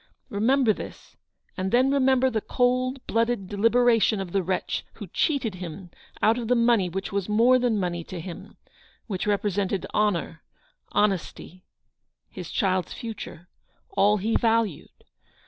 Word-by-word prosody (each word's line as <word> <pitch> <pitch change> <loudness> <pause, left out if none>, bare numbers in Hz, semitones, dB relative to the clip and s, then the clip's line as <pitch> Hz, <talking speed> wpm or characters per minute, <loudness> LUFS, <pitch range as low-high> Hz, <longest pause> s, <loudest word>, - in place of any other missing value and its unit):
Remember 230 +3 +3
this; - - -10 0.4
and 190 0 -2
then 255 +3 +4
remember 260 -1 +3
the 220 -2 -1
cold 255 +2 0
blooded 230 -3 0
deli 205 +3 +2
beration 230 -3 +3
of 190 -3 -5
the 195 - +1
wretch 185 +1 -2
who - - -8
cheated 275 - 0
him 180 0 -8 0.3
out 225 +3 +4
of 235 - -4
the 250 - +3
money 235 -6 +3
which 195 +2 -4
was 200 0 -2
more 235 +4 +5
than 240 -4 +1
money 175 -2 -2
to 185 - -7
him 170 +1 -9 0.2
— - - -31
which 195 -2 -4
represented 200 -2 0
honour 180 -6 0 0.3
— - - -44
honesty 185 -2 -1 0.3
— - - -54
his - - -8
child's 185 -4 0
future 210 -6 -8 0.2
— - - -42
all 205 +1 +4
he 215 +3 -1
valued. 225 -8 0
210 Hz, 160 wpm, -25 LUFS, 190-240 Hz, 0.4 s, more